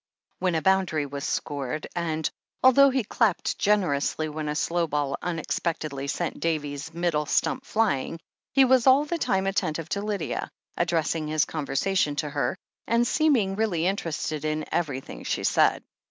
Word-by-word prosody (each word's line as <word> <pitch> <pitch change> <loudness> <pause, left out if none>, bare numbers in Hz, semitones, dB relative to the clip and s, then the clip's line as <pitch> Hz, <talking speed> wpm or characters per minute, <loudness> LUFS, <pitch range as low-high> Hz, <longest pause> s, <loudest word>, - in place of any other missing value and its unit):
when 180 -2 +1
a 160 - 0
boundary 190 -6 +2
was 140 0 -6
scored, 145 +1 -3
and 160 -2 -1 0.4
although 275 +2 +7
he 260 -2 0
clapped 210 -3 +1
generously 160 -6 +1
when 155 0 -4
a 150 - -2
slow 170 +2 0
ball 145 -2 -1
unexpectedly 155 -4 -3
sent 170 +4 -2
Davy's 150 -2 -2
middle^ 165 -3 -1
stump 260 - +1
flying, 165 - 0 0.3
he 270 -1 +5
was 255 -1 +4
all 270 +3 +6
the 335 +3 -2
time 190 -8 +1
attentive 165 -4 -1
to 200 - -1
Lydia, 205 -4 -3 0.3
addressing 165 -2 0
his 155 +1 +2
conversa 155 +5 -2
tion 150 -6 +2
to 150 0 -2
her, 145 +5 -1 0.3
and 235 +1 +3
seeming 240 -11 +2
really 195 -6 0
interested 160 -5 -2
in 155 0 -1
everj^hing 135 - -3
she - - -2
said. - - +3
165 Hz, 155 wpm, -26 LUFS, 150-200 Hz, 0.4 s, although